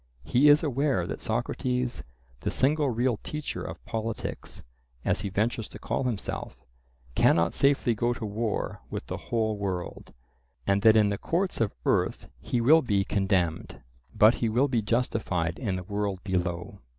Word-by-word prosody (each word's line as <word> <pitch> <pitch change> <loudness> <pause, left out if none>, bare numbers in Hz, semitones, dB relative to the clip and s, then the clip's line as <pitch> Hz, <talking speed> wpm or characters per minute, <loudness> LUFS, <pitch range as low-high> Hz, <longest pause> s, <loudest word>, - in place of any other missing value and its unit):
He 140 +5 +4
is 145 +2 +6
aware 135 - +1
that - - -5
Socrates, 125 +2 -1 0.4
the - - -2
single 145 +1 +2
real 120 0 +1
teacher 150 +5 -5
of - - -8
politics, 115 0 -4 0.4
as - - +1
he 100 - -3
ventures 110 +3 -1
to - - -9
call - - -2
himself, 100 - -4 0.5
cannot 85 +6 +3
safely 140 -3 +3
go 120 +2 0
to 120 - -5
war 110 +1 -2
with - - -5
the - - -4
whole 110 -2 0
world, 95 -3 -4 0.5
and 100 0 +2
that 110 +1 +6
in 105 -2 +4
the 100 -1 -2
courts 180 -2 -1
of 110 - 0
earth - - 0
he 120 - -1
will 155 +7 +6
be 100 -7 +1
condemned. 95 -6 0 0.4
But 110 +2 +7
he 115 - +2
will 125 +6 +3
be 120 -4 +1
justified 105 -7 -1
in 105 -7 -1
the 90 - -4
world 100 -1 -3
below. 90 0 -2
110 Hz, 165 wpm, -27 LUFS, 100-125 Hz, 0.5 s, But